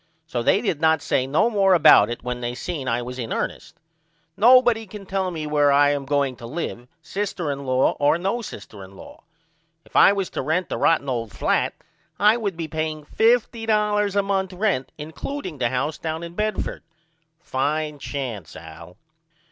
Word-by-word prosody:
So 125 -7 -3
they 195 - +3
did 185 -10 -2
not 160 -2 +3
say 130 - 0
no 150 +11 +2
more 195 -3 +4
about 150 -10 +7
it 120 - -6
when 125 0 -4
they 120 0 -3
seen 150 -2 -5
I 120 0 0
was 125 +1 -7
in 115 -2 -5
ernest. - - -4 0.6
Nobody 240 -1 +5
cannot 195 -1 -11
tell 190 -1 -1
me 160 -3 -5
where 145 -1 +3
I 145 +1 +5
am 140 -1 -2
going 140 -2 0
to 115 - -9
live 125 -4 -5 0.2
sister 190 -6 -3
in 140 0 -6
law 130 +1 +3
or 145 +3 +3
no 195 +7 -2
sister 100 - -10
in 95 +1 -13
law. - - -13 0.6
If - - -23
I - - +7
was 195 -2 -2
to - - -3
rent 160 +6 -1
the - - -3
rotten 165 -4 +2
old 115 -4 -3
flat - - 0 0.4
I 210 +2 +5
would 205 -7 -3
be 165 -2 -4
paying 155 -1 -4
$50 215 -2 +1
a 200 - +3
month 195 -1 -1
rent 180 -8 -1
includeing 160 - -6
the 120 - +1
house 135 +5 -2
down 160 +1 -4
in 170 0 -8
Bedford. 215 +2 -2 0.6
Fine 150 0 -2
chance 125 - -6
Al. 85 0 -12
155 Hz, 185 wpm, -23 LUFS, 130-195 Hz, 0.6 s, about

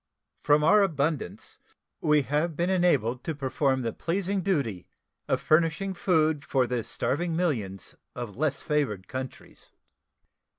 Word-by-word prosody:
From 150 +1 +3
our 205 +7 +6
abundance 150 - -2 0.4
we 150 -1 +3
have 150 +4 -1
been 175 +4 0
enabled 140 - +2
to 160 - -3
perform 135 -1 0
the 115 -2 -2
pleasing 190 +3 -1
duty 140 - -1 0.4
of - - +1
furnishing 165 +4 +2
food 160 -5 +1
for 135 -6 +1
the 120 -1 -2
starving 165 +10 -2
millions 115 - -2 0.2
of 120 -5 -6
less 145 0 -1
favored 115 -11 -1
countries. 130 +1 -8
150 Hz, 130 wpm, -27 LUFS, 130-170 Hz, 0.4 s, our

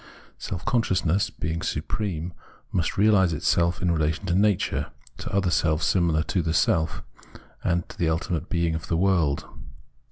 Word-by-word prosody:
Self 90 - -5
consciousness, 95 -5 +1
being 80 +1 -4
supreme, 85 +2 -3 0.4
must 85 -4 -1
realise 100 -4 +4
itself 85 +2 +1
in 90 - +2
relation 80 +2 0
to 90 - 0
nature, 100 0 +1 0.3
to - - -5
other 95 -2 +1
selves 80 -1 +1
similar 85 -4 +2
to 90 - -1
the 80 0 -1
self, 80 +1 +1 0.6
and 85 -1 0
to - - -13
the 85 - +2
Ultimate 80 +1 -2
Being 85 -1 0
of 80 0 -5
the 85 - 0
world. 85 -6 +2
85 Hz, 155 wpm, -25 LUFS, 80-95 Hz, 0.6 s, realise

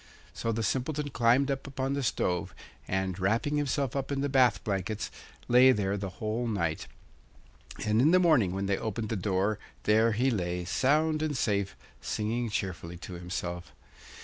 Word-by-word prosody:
So 115 - -2
the 115 0 -1
Simpleton 140 +6 -1
climbed 125 +4 +3
up 135 0 -4
upon 135 0 -2
the 140 - -1
stove, 90 -6 -1 0.3
and, 95 0 -1
wrapping 115 +10 +1
himself 140 -3 -1
up 135 0 -2
in 140 -1 -1
the 145 - 0
bath 130 -3 +3
blankets, 100 +1 -2 0.4
lay 125 +2 +7
there 100 -4 0
the 100 -1 -3
whole 110 +3 -2
night. 85 -8 -1 1.0
And 105 +2 +3
in 145 - +5
the 180 - +6
morning 155 - +4
when 95 +1 -2
they 95 0 0
opened 110 0 -3
the 115 - -1
door 100 +2 0 0.2
there 110 +2 +4
he 130 +5 +2
lay 90 -4 -2
sound 155 - +2
and 155 -3 -1
safe, 100 -4 0 0.3
singing 115 +2 -2
cheerfully 90 -4 -4
to 90 - -9
himself. 90 0 -5
110 Hz, 170 wpm, -29 LUFS, 95-135 Hz, 1.0 s, lay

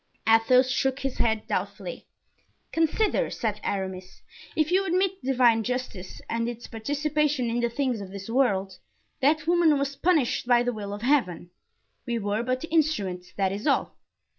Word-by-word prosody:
Athos 250 +3 +5
shook 265 +1 0
his 270 -1 -3
dead 220 -2 0
doubtfully. - - -4 0.6
"Consider," 330 +7 +1
said 215 -4 -3
Aramis, 190 -1 -4 0.3
"if 310 +1 +1
you 380 +2 +3
admit 380 +1 0
divine 245 -4 +3
justice 250 -7 -4
and 230 +1 -1
its 240 0 -7
participation 290 +1 -1
in 240 - 0
the 235 0 +1
things 250 -2 -1
of 195 - -7
this 195 0 -8
world, 200 -6 0 0.4
that 300 +2 +2
woman 335 -3 +4
was 280 0 -2
punished 305 -7 +1
by 240 -1 +4
the 245 0 -1
will 205 -2 -6
of 205 +2 -6
heaven. 210 - +1 0.6
We 235 -1 -1
were 205 0 -1
but 255 +2 -1
the 325 - -7
instruments, 205 - 0
that 195 -2 +1
is 205 +7 -4
all." 275 - +1
245 Hz, 165 wpm, -26 LUFS, 210-295 Hz, 0.6 s, Athos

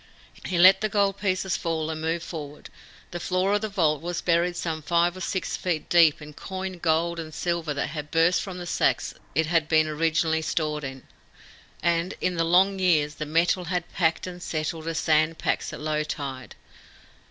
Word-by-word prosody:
He 180 - -1
let 185 +2 +7
the 215 - 0
gold 200 -1 +1
pieces 190 -2 0
fall, 160 -1 -2
and 155 0 -5
move 165 +1 -1
forward. 150 -4 -8 0.4
The 175 - -4
floor 185 +3 0
of 205 - +1
the 215 - -2
vault 155 -7 +1
was 175 +1 -3
buried 175 +1 +1
some 165 -2 -3
five 170 +3 +2
or 185 - -8
six 190 +1 -2
feet 170 -4 -3
deep 165 -3 +5
in 150 0 -11
coined 185 +2 -6
gold 170 +1 +1
and 160 -1 -6
silver 170 -1 -2
that 140 - -1
had 150 -1 -6
burst 165 +3 +3
from 190 -2 -6
the 175 - -6
sacks - - 0 0.2
it 160 +2 +3
had 160 -1 +1
been 155 -1 +3
originally 160 +1 +1
stored 155 -1 -2
in, 135 -1 -7 0.8
and, 170 +2 +1
in 180 - 0
the 165 -1 0
long 190 +4 +3
years, 155 -5 +2
the 150 - -2
metal 170 +3 +1
had 175 0 -3
packed 165 -3 +1
and 180 -1 -8
settled 160 0 -3
as 165 -1 -2
sand 155 0 +2
packs - - -1
at - - -8
low 155 0 -1
tide. 135 -4 -6
165 Hz, 195 wpm, -25 LUFS, 155-180 Hz, 0.8 s, let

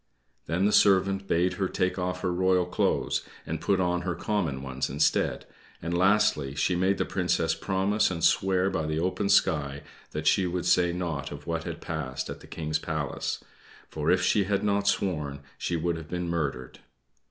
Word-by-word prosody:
Then 85 +5 +1
the 105 - +3
servant 95 -1 +4
bade 90 +2 +2
her 95 - +2
take 90 0 -1
off 90 0 -2
her 90 - 0
royal 90 0 +2
clothes, 90 - 0 0.2
and - - -4
put 100 -2 +2
on 90 -1 +1
her 90 -1 -2
common 85 -11 -2
ones 65 0 -3
instead; 75 +2 +1 0.3
and, 85 +2 -3
lastly, 90 -7 +2
she 75 +6 +1
made 95 +2 +2
the - - 0
Princess 85 -3 0
promise 95 +5 +1
and 85 -3 -4
swear 95 0 +3
by 80 -5 -1
the 80 0 -1
open 95 +3 -1
sky 70 -5 +2 0.3
that 75 +1 -5
she 95 +2 +3
would 90 0 -2
say 90 0 +4
nought 80 -6 -3
of 75 0 -8
what 80 -1 -3
had 85 -1 -6
passed 80 -6 -4
at - - -7
the - - -14
King's 80 -1 -2
palace; 80 -5 -3 0.5
for 75 0 -2
if 90 0 +3
she 100 +1 +3
had 100 0 0
not 100 -1 +1
sworn 75 -9 0
she 90 - -2
would 85 +1 -1
have 80 0 -9
been 90 0 -3
murdered. 80 -7 -3
90 Hz, 185 wpm, -27 LUFS, 80-95 Hz, 0.5 s, servant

